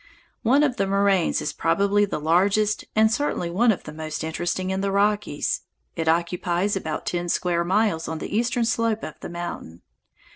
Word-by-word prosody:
One 270 Hz, +6 st, +4 dB
of 270 Hz, -4 st, +1 dB
the 195 Hz, -, +1 dB
moraines 195 Hz, -2 st, +2 dB
is 150 Hz, -, -2 dB
probably 200 Hz, +6 st, +2 dB
the 200 Hz, -, -3 dB
largest 195 Hz, +7 st, +2 dB
and 220 Hz, 0 st, +4 dB
certainly 240 Hz, -10 st, -1 dB
one 230 Hz, +6 st, +4 dB
of 200 Hz, -, -3 dB
the 150 Hz, -, -9 dB
most 155 Hz, 0 st, -5 dB
interesting 175 Hz, +3 st, -2 dB
in 190 Hz, 0 st, -1 dB
the 200 Hz, 0 st, 0 dB
Rockies. 205 Hz, -6 st, 0 dB, 0.3 s
It 165 Hz, -1 st, -3 dB
occupies 175 Hz, +3 st, +1 dB
about 160 Hz, -5 st, -4 dB
ten 175 Hz, 0 st, -2 dB
square 170 Hz, 0 st, +1 dB
miles 185 Hz, -2 st, +1 dB
on 160 Hz, -, -3 dB
the 180 Hz, -, -5 dB
eastern 235 Hz, +1 st, +1 dB
slope 230 Hz, -1 st, 0 dB
of 155 Hz, -, -7 dB
the -, -, -7 dB
mountain. 170 Hz, -, -7 dB
190 Hz, 180 wpm, -24 LUFS, 170-210 Hz, 0.3 s, One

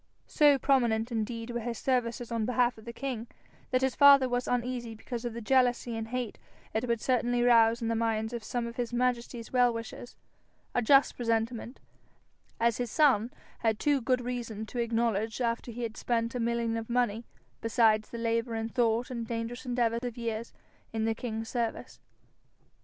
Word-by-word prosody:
So 290 Hz, -2 st, +5 dB
prominenf 240 Hz, -4 st, +2 dB
indeed 230 Hz, +1 st, -3 dB
were 240 Hz, -, -2 dB
his 235 Hz, 0 st, -4 dB
services 245 Hz, -2 st, -1 dB
on 230 Hz, -2 st, -1 dB
behalf 250 Hz, 0 st, +2 dB
of 220 Hz, -, -15 dB
the 235 Hz, -, -5 dB
king, 240 Hz, -2 st, -4 dB, 0.4 s
that 255 Hz, 0 st, +1 dB
his 265 Hz, -1 st, +2 dB
father 280 Hz, -2 st, +7 dB
was 245 Hz, 0 st, -1 dB
uneasy 245 Hz, -2 st, -2 dB
because 235 Hz, +2 st, -6 dB
of 240 Hz, -, -3 dB
the 235 Hz, -, -5 dB
jealousy 245 Hz, -1 st, +2 dB
and 225 Hz, 0 st, -4 dB
hate 245 Hz, -1 st, -4 dB, 0.3 s
it 225 Hz, +3 st, -1 dB
would 235 Hz, -1 st, +1 dB
certainly 245 Hz, -1 st, +1 dB
rouse 230 Hz, -1 st, +5 dB
in -, -, 0 dB
the 230 Hz, -, +1 dB
minds 225 Hz, 0 st, -1 dB
of 235 Hz, -2 st, -4 dB
some 240 Hz, +1 st, -2 dB
of 235 Hz, 0 st, -7 dB
his 245 Hz, -1 st, -2 dB
majesty's 240 Hz, -1 st, -1 dB
well 245 Hz, -1 st, +5 dB
wishers 230 Hz, +1 st, -7 dB, 0.6 s
a 245 Hz, -, +2 dB
just 275 Hz, +4 st, +5 dB
presentiment, 230 Hz, +1 st, -2 dB, 0.8 s
as 235 Hz, -1 st, +2 dB
his 245 Hz, -1 st, -2 dB
son 250 Hz, -6 st, +3 dB, 0.3 s
had 220 Hz, -2 st, +1 dB
too 285 Hz, +2 st, +2 dB
good 250 Hz, +1 st, +1 dB
reason 235 Hz, -3 st, -4 dB
to 240 Hz, -, -6 dB
acknowledge 225 Hz, -2 st, 0 dB
after 235 Hz, 0 st, -1 dB
he 240 Hz, +1 st, -5 dB
had 225 Hz, -2 st, -4 dB
spent 230 Hz, 0 st, -1 dB
a 250 Hz, -, -3 dB
million 235 Hz, -1 st, 0 dB
of 225 Hz, 0 st, -6 dB
money, 235 Hz, -2 st, +1 dB, 0.4 s
besides 220 Hz, -1 st, +3 dB
the 235 Hz, -, -7 dB
labour 230 Hz, 0 st, -1 dB
and 225 Hz, 0 st, -3 dB
thought 235 Hz, 0 st, +1 dB
and 235 Hz, -2 st, -4 dB
dangerous 230 Hz, +2 st, -4 dB
endeavour 235 Hz, -2 st, +1 dB
of 245 Hz, -2 st, -5 dB
years, 230 Hz, -1 st, -4 dB, 0.4 s
in 220 Hz, -1 st, -1 dB
the 225 Hz, -, +1 dB
king's 225 Hz, -1 st, -5 dB
service. 235 Hz, -2 st, -3 dB
235 Hz, 185 wpm, -29 LUFS, 225-245 Hz, 0.8 s, father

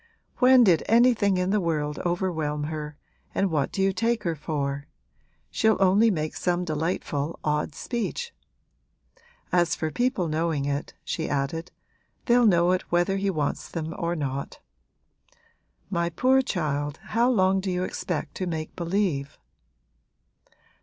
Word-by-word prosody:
'When 255 Hz, 0 st, +7 dB
did 175 Hz, -7 st, +4 dB
anything 225 Hz, -4 st, +4 dB
in 180 Hz, +1 st, 0 dB
the 210 Hz, -1 st, +2 dB
world 150 Hz, -3 st, -1 dB
overwhelm 165 Hz, -5 st, -1 dB
her 150 Hz, -1 st, -5 dB, 0.4 s
and 195 Hz, -2 st, +1 dB
what 150 Hz, -4 st, 0 dB
do 195 Hz, -, 0 dB
you 195 Hz, 0 st, +2 dB
take 230 Hz, +3 st, 0 dB
her 170 Hz, -3 st, 0 dB
for? 140 Hz, -2 st, -3 dB, 0.6 s
She'll 220 Hz, -1 st, +3 dB
only 195 Hz, +4 st, +5 dB
make 155 Hz, -6 st, -2 dB
some 180 Hz, 0 st, 0 dB
delightful 155 Hz, -1 st, -2 dB
odd 150 Hz, -1 st, -1 dB
speech. 250 Hz, -, -3 dB, 1.2 s
As 175 Hz, -1 st, +3 dB
for 160 Hz, -1 st, -3 dB
people 245 Hz, -, 0 dB
knowing 155 Hz, -2 st, -1 dB
it,' 145 Hz, +1 st, -3 dB
she 160 Hz, -1 st, -3 dB
added, 145 Hz, +5 st, -2 dB, 0.6 s
'they'll 240 Hz, -1 st, +5 dB
know 175 Hz, -2 st, +4 dB
it 185 Hz, -, +1 dB
whether 175 Hz, +3 st, +2 dB
he 195 Hz, 0 st, 0 dB
wants 150 Hz, -6 st, -2 dB
them 160 Hz, -1 st, -4 dB
or 170 Hz, -3 st, -2 dB
not. 140 Hz, -3 st, -4 dB, 1.3 s
My 170 Hz, -2 st, 0 dB
poor 260 Hz, +9 st, +3 dB
child, 150 Hz, -, -2 dB, 0.2 s
how 235 Hz, +3 st, +4 dB
long 190 Hz, -5 st, +3 dB
do 190 Hz, 0 st, -3 dB
you 180 Hz, 0 st, -1 dB
expect 175 Hz, -3 st, -3 dB
to 185 Hz, -, -2 dB
make 160 Hz, -2 st, -4 dB
believe?' 170 Hz, -6 st, -1 dB
175 Hz, 140 wpm, -26 LUFS, 155-195 Hz, 1.3 s, When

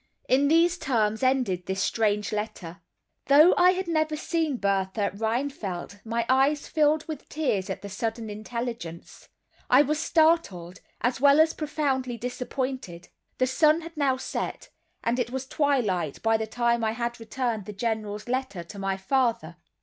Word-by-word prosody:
In 275 Hz, +2 st, +3 dB
these 335 Hz, +3 st, +3 dB
terms 220 Hz, -4 st, 0 dB
ended 255 Hz, -9 st, +1 dB
this 190 Hz, 0 st, -2 dB
strange 210 Hz, 0 st, 0 dB
letter. 210 Hz, -5 st, -5 dB, 0.5 s
Though 300 Hz, +6 st, +7 dB
I 365 Hz, +1 st, +5 dB
had 375 Hz, 0 st, -3 dB
never 310 Hz, -2 st, 0 dB
seen 315 Hz, -3 st, -1 dB
Bertha 200 Hz, 0 st, 0 dB
Rheinfeldt 220 Hz, -4 st, -3 dB
my 230 Hz, +1 st, -1 dB
eyes 275 Hz, +3 st, +2 dB
filled 305 Hz, 0 st, +2 dB
with 315 Hz, -2 st, -7 dB
tears 235 Hz, -12 st, -1 dB
at 190 Hz, +1 st, -5 dB
the -, -, -5 dB
sudden 225 Hz, +3 st, -3 dB
intelligence; 215 Hz, -5 st, -6 dB, 0.4 s
I 260 Hz, +3 st, +7 dB
was 300 Hz, +2 st, -1 dB
startled, 315 Hz, -, +1 dB, 0.2 s
as 245 Hz, 0 st, 0 dB
well 280 Hz, +1 st, +6 dB
as 320 Hz, 0 st, +5 dB
profoundly 270 Hz, -5 st, -2 dB
disappointed. 250 Hz, -6 st, -4 dB, 0.3 s
The 255 Hz, -, +3 dB
sun 305 Hz, +5 st, +3 dB
had 335 Hz, +1 st, -10 dB
now 275 Hz, -3 st, +1 dB
set, -, -, -5 dB, 0.3 s
and 235 Hz, +2 st, 0 dB
it 240 Hz, -1 st, -1 dB
was 265 Hz, +1 st, -4 dB
twilight 235 Hz, -, 0 dB
by 225 Hz, 0 st, +3 dB
the 220 Hz, 0 st, -1 dB
time 235 Hz, +1 st, 0 dB
I 220 Hz, 0 st, +1 dB
had 235 Hz, +1 st, -3 dB
returned 225 Hz, -2 st, -3 dB
the -, -, -5 dB
General's 210 Hz, 0 st, -3 dB
letter 255 Hz, -8 st, -2 dB
to 200 Hz, +4 st, -10 dB
my 195 Hz, 0 st, -1 dB
father. 230 Hz, -, 0 dB
240 Hz, 155 wpm, -26 LUFS, 210-285 Hz, 0.5 s, Though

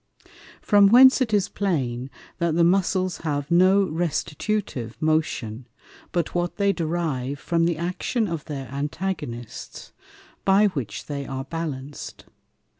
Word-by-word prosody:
From 205 Hz, -2 st, +6 dB
whence 260 Hz, +5 st, +7 dB
it 240 Hz, -4 st, +1 dB
is 205 Hz, -3 st, +2 dB
plain, 130 Hz, -10 st, -2 dB, 0.3 s
that 170 Hz, -2 st, +1 dB
the 170 Hz, -, +4 dB
Muscles 185 Hz, 0 st, +2 dB
have 145 Hz, -2 st, -3 dB
no 185 Hz, +3 st, +5 dB
restitutive 160 Hz, -, -2 dB
Motion, 135 Hz, -7 st, -1 dB, 0.4 s
but 170 Hz, -3 st, -1 dB
what 175 Hz, 0 st, -1 dB
they 200 Hz, -1 st, +2 dB
derive 155 Hz, -6 st, -2 dB
from 165 Hz, +4 st, 0 dB
the 170 Hz, -2 st, 0 dB
Action 180 Hz, +7 st, -1 dB
of 165 Hz, -5 st, -4 dB
their 135 Hz, -3 st, -5 dB
Antagonists, 140 Hz, -, -5 dB, 0.5 s
by 200 Hz, +2 st, +5 dB
which 135 Hz, -, -5 dB
they 140 Hz, -2 st, -5 dB
are 135 Hz, 0 st, -4 dB
balanc'd. 145 Hz, -3 st, -6 dB
165 Hz, 125 wpm, -24 LUFS, 140-190 Hz, 0.5 s, whence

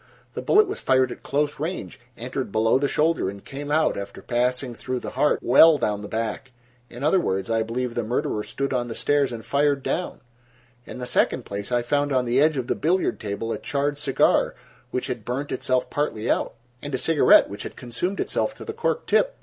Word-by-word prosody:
The -, -, -4 dB
bullet 420 Hz, +1 st, +4 dB
was 400 Hz, -, -4 dB
fired 130 Hz, -1 st, +2 dB
at -, -, -8 dB
close 145 Hz, 0 st, -1 dB
range, 160 Hz, -2 st, -4 dB, 0.2 s
entered 125 Hz, -1 st, -4 dB
below 110 Hz, +4 st, +3 dB
the 140 Hz, -, +1 dB
shoulder 155 Hz, -, +1 dB
and 100 Hz, 0 st, -10 dB
came 145 Hz, +1 st, -7 dB
out, 155 Hz, +1 st, +2 dB
after 100 Hz, 0 st, -6 dB
passing 125 Hz, +1 st, 0 dB
through 125 Hz, +2 st, -4 dB
the -, -, -6 dB
heart, 150 Hz, -, +2 dB
well 150 Hz, +5 st, +7 dB
down 105 Hz, -6 st, -1 dB
the 105 Hz, -, -6 dB
back. 115 Hz, +3 st, -3 dB, 0.4 s
In 120 Hz, +3 st, -9 dB
other 160 Hz, +6 st, +4 dB
words, 95 Hz, -, -1 dB
I 115 Hz, 0 st, +2 dB
believe 120 Hz, +2 st, -2 dB
the 120 Hz, -, -1 dB
murderer 120 Hz, +1 st, -1 dB
stood 140 Hz, +5 st, -3 dB
on 120 Hz, -1 st, -1 dB
the 115 Hz, -, -6 dB
stairs 145 Hz, -2 st, +1 dB
and 115 Hz, -2 st, -7 dB
fired 140 Hz, -1 st, +1 dB
down. 180 Hz, -, -3 dB, 0.7 s
In -, -, -8 dB
the 125 Hz, -, -5 dB
second -, -, +1 dB
place, 100 Hz, +3 st, -6 dB
I 120 Hz, -1 st, +1 dB
found 145 Hz, +3 st, 0 dB
on 130 Hz, -2 st, +2 dB
the 125 Hz, +3 st, +2 dB
edge 155 Hz, -1 st, +3 dB
of 130 Hz, -, -1 dB
the -, -, 0 dB
billiard 180 Hz, +4 st, 0 dB
table 110 Hz, +2 st, -4 dB
a -, -, -5 dB
charred 145 Hz, 0 st, -1 dB
cigar 135 Hz, -2 st, +2 dB, 0.3 s
which 125 Hz, -, -2 dB
had 125 Hz, -4 st, -4 dB
burned 130 Hz, +6 st, -3 dB
itself 130 Hz, 0 st, 0 dB
partly 120 Hz, -6 st, -1 dB
out, -, -, -1 dB, 0.3 s
and 145 Hz, -2 st, -4 dB
a -, -, 0 dB
cigarette 160 Hz, +3 st, +5 dB
which 100 Hz, +1 st, -8 dB
had -, -, -7 dB
consumed 135 Hz, +11 st, -4 dB
itself -, -, -1 dB
to -, -, -10 dB
the 440 Hz, -, -5 dB
cork 470 Hz, +1 st, -1 dB
tip. -, -, +2 dB
130 Hz, 215 wpm, -24 LUFS, 120-145 Hz, 0.7 s, well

